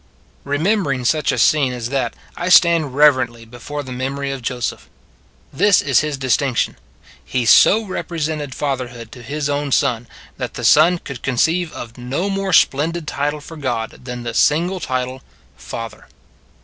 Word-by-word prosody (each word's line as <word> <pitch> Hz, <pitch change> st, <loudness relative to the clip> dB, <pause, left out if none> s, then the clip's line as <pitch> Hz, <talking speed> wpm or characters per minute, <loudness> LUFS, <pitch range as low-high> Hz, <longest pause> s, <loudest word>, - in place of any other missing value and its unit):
Remembering 145 Hz, -, 0 dB
such 155 Hz, +3 st, +2 dB
a -, -, -2 dB
scene 140 Hz, -5 st, +3 dB
as 120 Hz, -1 st, -4 dB
that 130 Hz, -3 st, -1 dB, 0.2 s
I 175 Hz, +1 st, -3 dB
stand 170 Hz, -6 st, +5 dB
reverently 130 Hz, -6 st, +3 dB
before 125 Hz, +5 st, -7 dB
the 130 Hz, -, -9 dB
memory 135 Hz, +2 st, -3 dB
of 135 Hz, -1 st, -5 dB
Joseph. 120 Hz, 0 st, -4 dB, 0.6 s
This 200 Hz, +6 st, +4 dB
is 140 Hz, -2 st, +3 dB
his 150 Hz, -2 st, -2 dB
distinction 130 Hz, -1 st, 0 dB, 0.5 s
he 125 Hz, -2 st, -2 dB
so 205 Hz, -, +6 dB
represented 155 Hz, -7 st, -4 dB
fatherhood 125 Hz, -5 st, -4 dB
to 125 Hz, -, -11 dB
his 145 Hz, +5 st, -3 dB
own 145 Hz, 0 st, -2 dB
Son, 120 Hz, -2 st, +1 dB, 0.3 s
that -, -, -5 dB
the -, -, -4 dB
Son 180 Hz, +1 st, +5 dB
could 140 Hz, -7 st, -9 dB
conceive 160 Hz, +6 st, 0 dB
of 120 Hz, +1 st, -9 dB
no 140 Hz, +11 st, -2 dB
more 195 Hz, 0 st, -2 dB
splendid 160 Hz, +3 st, +2 dB
title 145 Hz, +1 st, -2 dB
for 160 Hz, +2 st, -11 dB
God 120 Hz, -6 st, -2 dB
than 125 Hz, -1 st, -6 dB
the 120 Hz, -1 st, -4 dB
single 175 Hz, +9 st, +2 dB
title, 130 Hz, -3 st, -3 dB, 0.2 s
" -, -, -33 dB
Father." 115 Hz, -2 st, -8 dB
140 Hz, 160 wpm, -19 LUFS, 125-155 Hz, 0.6 s, so